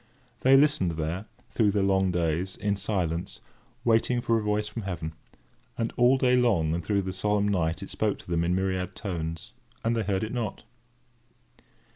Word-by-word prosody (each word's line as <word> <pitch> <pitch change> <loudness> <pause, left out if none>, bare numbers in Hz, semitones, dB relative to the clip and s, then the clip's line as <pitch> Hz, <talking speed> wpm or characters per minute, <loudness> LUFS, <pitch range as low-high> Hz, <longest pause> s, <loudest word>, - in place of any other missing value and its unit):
They 135 +1 +6
listened 145 - +3
there, 80 +6 -3 0.2
through 110 -3 +3
the 100 -1 +1
long 95 -1 +3
days, 85 +1 -1
in 100 -1 0
silence, 90 -5 -2 0.5
waiting 120 +1 +3
for 115 -1 +1
a - - -4
voice 105 0 0
from 105 +2 -5
heaven; 85 -5 -4 0.6
and 115 -1 -2
all 125 +2 +5
day 125 -1 +3
long 100 -11 +2
and 85 +1 -2
through 100 +3 0
the 95 0 -4
solemn 105 +2 +1
night 80 -5 0
it - - -8
spoke - - 0
to - - -16
them 85 -1 +2
in 90 +1 +1
myriad 95 -1 -1
tones, 80 -5 -5 0.3
and 115 +1 +2
they 115 - +1
heard 100 -1 -1
it 110 - -4
not. 115 -5 -3
100 Hz, 180 wpm, -27 LUFS, 85-115 Hz, 0.6 s, They